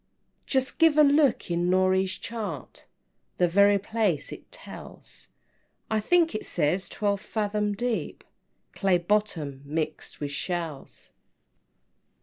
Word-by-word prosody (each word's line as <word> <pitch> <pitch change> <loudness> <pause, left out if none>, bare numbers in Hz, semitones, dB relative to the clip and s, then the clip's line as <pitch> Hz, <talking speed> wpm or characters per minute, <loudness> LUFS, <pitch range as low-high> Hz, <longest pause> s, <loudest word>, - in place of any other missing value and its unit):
VII. - - -47
"Just 265 +1 -1
give 325 -2 +5
a 305 - +8
look 280 - +3
in 175 +1 +1
Norey's 185 0 +2
chart, 225 -1 -6 0.5
The 180 - +4
very 200 +3 +5
place 205 -6 -1
it - - -11
tells; - - -10 0.6
I 220 - +2
think 335 +9 +3
it 215 - -3
says 175 +4 0
twelve 200 -2 -1
fathom 210 -1 -1
deep, 240 0 -3 0.5
Clay 190 -2 +2
bottom, 170 -7 -1
mixed 155 +2 -4
with 145 -1 -3
shells." 165 -3 -5
200 Hz, 125 wpm, -27 LUFS, 175-220 Hz, 0.6 s, a